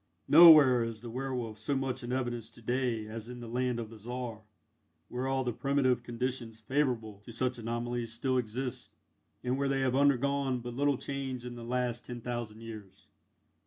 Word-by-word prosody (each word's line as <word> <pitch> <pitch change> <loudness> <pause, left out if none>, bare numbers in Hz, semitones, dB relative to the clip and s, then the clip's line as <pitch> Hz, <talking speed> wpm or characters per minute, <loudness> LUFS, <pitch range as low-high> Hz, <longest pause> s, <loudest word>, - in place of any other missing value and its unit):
Nowhere 150 -7 +9
is 115 -2 -5
the 120 -1 -7
werwolf 125 -4 -3
so 110 +6 -1
much 135 -1 -2
in 120 - -4
evidence 120 -3 -2
to 120 - -16
day 120 -2 0
as 110 +1 -7
in 125 0 -7
the 120 - -8
land 125 +1 -1
of 115 -1 -6
the 110 - -11
Czar, 120 0 -5 0.7
where 125 +2 -2
all 135 0 +1
the 120 -2 -1
primitive 135 -1 +1
conditions 120 -1 -4
favourable 115 -4 -1
to 105 +3 -12
such 125 +2 -1
anomalies, 120 0 -3
still 130 +3 0
exist, 125 +2 -4 0.5
and 125 +2 0
where 140 0 +1
they 135 -1 +1
have 130 -1 +1
undergone 140 -1 +2
but 120 0 -6
little 140 +1 +2
change 135 -3 -4
in 125 - -5
the 120 -1 -8
last 120 0 -1
ten 120 -1 -6
thousand 120 -2 -5
years. 105 -4 -10
125 Hz, 185 wpm, -31 LUFS, 115-130 Hz, 0.7 s, Nowhere